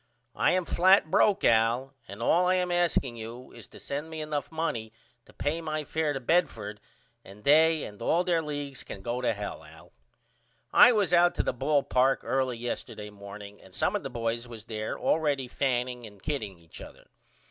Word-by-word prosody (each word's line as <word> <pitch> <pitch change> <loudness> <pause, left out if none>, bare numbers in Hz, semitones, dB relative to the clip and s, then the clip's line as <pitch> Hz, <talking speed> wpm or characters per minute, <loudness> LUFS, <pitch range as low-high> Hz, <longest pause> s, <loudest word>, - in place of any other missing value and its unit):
I - - +2
am 185 -1 +1
flat 185 -2 +4
broke 205 -1 +3
Al 115 +4 +2
and 100 +4 -7
all 180 +8 +3
I 185 - +3
am 180 -1 0
asking 170 -8 +1
you 115 +3 -9
is - - -11
to - - -14
send 145 +3 -5
me 160 -1 -6
enough 150 -1 -3
money 140 -9 -3 0.4
to - - -16
pay 160 +3 -2
my 155 -1 -3
fair 155 0 -1
to 135 - -3
Bedford 120 - 0 0.4
and 100 +2 -14
they 160 +2 +5
ahd 105 +2 -8
all 165 +9 +2
their 175 -2 +1
leagues 145 -3 -5
can 95 - -9
go 120 +3 -2
to 125 - +2
hell 105 -2 -6
Al. - - -16 0.8
I - - +9
was 205 -7 +1
out 175 0 +5
to - - 0
the - - -1
ball 140 +3 +1
park 130 +1 +2
early 130 -2 0
yesterday 110 -3 -5
morning 100 0 -11
and 95 -1 -15
some 190 - +1
of 205 - -1
the - - -5
boys 115 0 -3
was 115 -2 -10
there 110 -1 -4
allready 145 -5 0
fanning 125 -2 -2
and 105 -1 -16
kidding 110 - -3
each 85 -1 -13
other. - - -12
135 Hz, 195 wpm, -28 LUFS, 115-160 Hz, 0.8 s, I